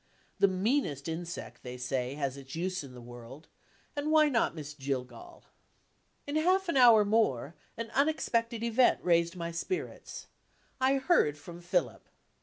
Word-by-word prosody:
The 200 - +6
meanest 185 - 0
insect, 170 +2 -6
they 125 0 -7
say, 125 +1 -2
has 140 -3 -2
its 135 0 -10
use 185 0 -2
in 130 -2 -11
this 120 - -11
world 120 +5 -11 0.5
and 290 +1 -2
why 310 -1 +5
not 230 - +1
Miss 150 -2 -7
Jillgall? 140 - -6 0.8
In 285 +2 -2
half 370 +4 +2
an 335 - -1
hour 235 -5 +7
more, 200 - +1 0.2
an 230 0 -5
unexpected 235 -6 0
event 235 +2 +4
raised 170 0 +2
my 170 -1 -4
spirits. 270 - -5 0.5
I 260 +1 +3
heard 265 - +2
from 170 +4 -11
Philip. 170 - -2
175 Hz, 150 wpm, -30 LUFS, -, 0.8 s, hour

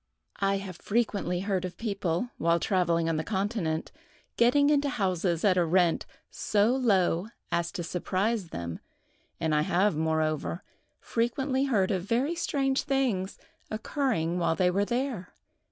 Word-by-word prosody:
I 195 0 +2
have 190 -3 -7
frequently 200 -5 -1
heard 190 -2 -1
of 180 -1 -5
people, 200 0 -2
while 170 +1 +3
travelling 170 -3 +1
on 165 -1 0
the 155 - -1
continent, 190 -5 -2 0.4
getting 285 +5 +4
into 290 -1 +2
houses 185 -6 0
at 185 -2 +4
a 180 - +4
rent 170 0 +2 0.2
so 215 +4 +2
low 195 -7 +2 0.2
as 170 0 0
to 175 - -3
surprise 190 +4 -1
them, 85 - -5 0.6
and 160 -1 0
I 150 - +3
have, 180 +4 +2
moreover, 160 +2 -1 0.4
frequently 260 +3 0
heard 215 -7 +2
of 190 -2 0
very 240 - 0
strange 275 -5 0
things 255 -9 0 0.3
occurring 215 - -1
while 165 -1 +1
they 180 +1 +3
were 200 +3 +1
there. 240 -5 -3
190 Hz, 145 wpm, -28 LUFS, 170-235 Hz, 0.6 s, getting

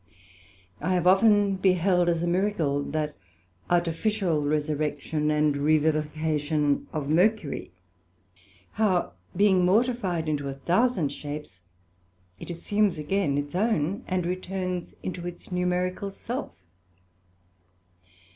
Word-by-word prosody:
I 180 +5 0
have 175 -1 0
often 200 +1 +5
beheld 180 -1 +3
as 170 0 0
a - - 0
miracle, 175 -6 +1
that 150 0 -2 0.5
artificial 175 0 +1
resurrection 150 0 -1
and 150 -1 +2
revivification 155 0 +1
of 150 -3 -3
Mercury, 175 0 +1 1.0
how 200 -5 +1 0.2
being 190 -1 +4
mortified 190 -4 +1
into 145 -2 -1
a 135 - -5
thousand 175 - +1
shapes, 145 -9 -8 0.8
it - - -9
assumes 200 +2 0
again 150 -1 0
its 145 +1 -3
own, 195 -3 0
and 185 -2 -1
returns 185 0 -3
into 175 -1 -4
its 175 +1 -10
numerical 180 +2 -1
self. 235 +6 -6
175 Hz, 105 wpm, -26 LUFS, 150-190 Hz, 1.0 s, often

